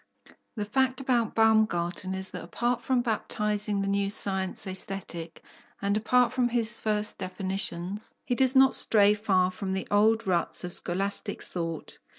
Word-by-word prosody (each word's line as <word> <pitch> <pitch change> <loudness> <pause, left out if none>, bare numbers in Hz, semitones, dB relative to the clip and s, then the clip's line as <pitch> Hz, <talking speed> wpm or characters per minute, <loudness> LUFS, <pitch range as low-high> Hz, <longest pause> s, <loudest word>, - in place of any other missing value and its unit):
The 210 -2 -3
fact 260 +4 0
about 245 -4 0
Baumgarten 195 -5 +1
is 190 0 -2
that 180 - -7
apart 240 +8 -2
from 255 -2 0
baptizing 210 -2 0
the 195 - -2
new 200 0 0
science 190 -1 -1
Aesthetic, 185 -3 -6 0.4
and 200 +1 0
apart 245 +3 +2
from 250 -2 +1
his 235 -1 +2
first 210 -1 -2
definitions, 190 +1 -4
he - - -1
does 260 +1 +4
not 265 0 +6
stray 205 -2 +5
far 190 -3 +1
from 190 +1 -4
the 190 - -3
old 220 +2 +3
ruts 180 -2 +1
of 180 -1 -4
scholastic 195 +3 -2
thought. 165 -2 -5
205 Hz, 155 wpm, -27 LUFS, 190-225 Hz, 0.4 s, not